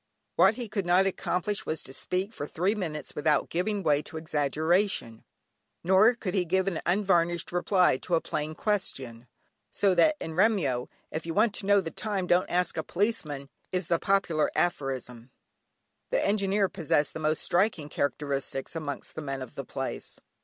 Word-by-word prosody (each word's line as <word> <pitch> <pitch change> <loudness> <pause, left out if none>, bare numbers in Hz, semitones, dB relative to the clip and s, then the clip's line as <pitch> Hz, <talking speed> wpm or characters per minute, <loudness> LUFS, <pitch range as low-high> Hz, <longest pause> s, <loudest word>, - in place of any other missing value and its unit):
What - - +5
he 245 -2 -5
could 200 -3 -3
not 180 +2 +5
accomplish 195 +1 -1
was 155 -1 -2
to 130 - -10
speak 185 +8 -2
for 145 - -5
three 185 +7 0
minutes 165 -8 -4
without 150 0 +1
giving 200 +3 -1
way 150 -2 +3
to 160 - -8
exaggeration; 155 - 0 0.6
nor 195 +7 +5
could 190 -6 -4
he 190 - +2
give 190 +2 +1
an 175 -5 -1
unvarnished 175 -3 +2
reply 180 -3 +3
to 175 - -1
a - - +3
plain 155 0 -3
question, 130 - -2 0.4
so 200 -1 +2
that 310 - +4
in 160 - -5
Remyo 165 - +2 0.2
"if 160 +2 -4
you 165 - -3
want 215 +1 +3
to 195 - -3
know 200 -1 +5
the 165 - -5
time 200 -4 -2
don't 180 +1 +2
ask 180 -1 0
a - - -1
policeman" 165 -9 -2 0.2
is 180 -2 -2
the 170 -1 +2
popular 195 -6 +2
aphorism. 130 -7 -2 0.8
The - - +1
Engineer 200 -1 +2
possessed 150 -6 0
the - - -5
most 155 0 0
striking 180 -4 +1
characteristics 140 0 -2
amongst 150 -3 -4
the 160 - -5
men 135 -2 -4
of 130 - -11
the - - -6
place. - - -5
175 Hz, 175 wpm, -28 LUFS, 150-195 Hz, 0.8 s, What